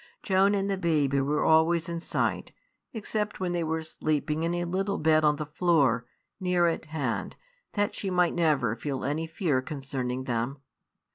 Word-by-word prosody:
Joan 195 +1 +3
and 195 0 0
the 195 -1 -1
baby 145 -6 +2
were 145 +2 0
always 160 +2 +4
in 170 -1 -3
sight; - - -2 0.4
except 210 -2 -3
when 185 -2 -1
they 175 -1 0
were 160 0 -2
sleeping 155 0 -1
in 170 +1 0
a 175 - -1
little 195 +3 -1
bed 155 0 +3
on 150 -1 +4
the 150 +1 -4
floor, 145 -7 +2 0.3
near 180 -2 +2
at 165 -1 0
hand, 145 -7 -3 0.4
that 205 -1 0
she 195 - -4
might 180 -1 +2
never 145 -9 +2
feel 135 +2 -4
any 155 +4 -1
fear 160 -5 0
concerning 130 -3 -4
them. 120 +2 -2
160 Hz, 170 wpm, -28 LUFS, 140-175 Hz, 0.4 s, always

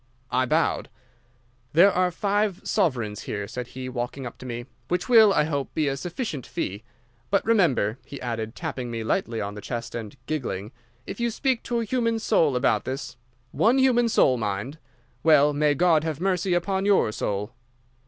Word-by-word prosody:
"I 130 0 +2
bowed. - - +1 0.8
"'There 180 +6 +7
are 180 0 +2
five 200 +1 0
sovereigns 120 - 0
here,' 100 -1 -3
said 125 +2 -6
he, 130 0 -4
walking 125 +1 -4
up 120 - -8
to 130 - -8
me, 120 0 -5 0.2
'which 180 0 -1
will, 225 -4 +7
I 170 - +3
hope, 145 -3 -2
be 155 -2 +1
a 135 - 0
sufficient 170 - -4
fee. 100 -1 -4 0.5
But 200 - +1
remember,' 150 - +2
he 140 - -9
added, 115 -2 -4
tapping 135 -7 -4
me 115 -1 -4
lightly 115 +1 -1
on 100 0 -4
the 105 - -8
chest 115 0 -5
and 115 +1 -6
giggling, 120 -9 -3 0.3
'if - - -7
you 235 0 +1
speak 255 +1 0
to 235 -1 0
a - - -2
human 230 -1 0
soul 165 - +2
about 125 - +2
this—one 130 - -2
human 245 -3 +4
soul, 130 - +4
mind—well, 140 +7 0
may 145 0 +2
God 165 0 +3
have 160 -2 -3
mercy 185 0 +1
upon 190 +2 0
your 200 - +3
soul!" 105 +1 -3
145 Hz, 175 wpm, -25 LUFS, 120-195 Hz, 0.8 s, There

